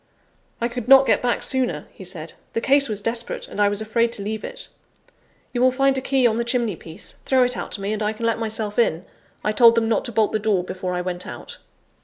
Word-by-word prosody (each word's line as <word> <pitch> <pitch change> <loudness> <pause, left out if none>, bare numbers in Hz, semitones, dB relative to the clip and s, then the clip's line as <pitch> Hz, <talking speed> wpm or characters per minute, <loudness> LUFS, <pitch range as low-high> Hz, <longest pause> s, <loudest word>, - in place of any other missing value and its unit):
"I 235 - 0
could 245 -1 -6
not 270 0 +8
get - - +2
back 245 -1 0
sooner," 255 - -1
he - - -12
said; 170 -3 -7 0.2
"the - - 0
case 275 +2 +4
was 210 -1 -2
desperate, 230 +2 -1
and 210 - -4
I 205 - +4
was 205 +1 -1
afraid 230 +2 +1
to 200 - -5
leave 215 +1 -4
it. - - -6 0.9
You 245 - -1
will 255 0 +5
find 270 +1 +2
a 265 - -1
key 265 -1 +1
on 225 -2 +3
the 235 - 0
chimney 235 -4 0
piece 160 0 -10
throw 260 -1 +3
it 250 0 +2
out - - -5
to 200 - -4
me, 200 +2 -2
and 215 - -4
I 210 0 +1
can 220 +1 -5
let 230 -1 +1
myself 220 -1 -3
in; 180 -6 +1 0.4
I 210 - +1
told 230 +1 +6
them 230 -1 +1
not 225 - +1
to 240 - -3
bolt 220 -1 +2
the 215 - 0
door 205 -4 +1
before 185 0 -4
I 180 - -1
went 180 0 -4
out." - - -9
225 Hz, 255 wpm, -22 LUFS, 205-245 Hz, 0.9 s, not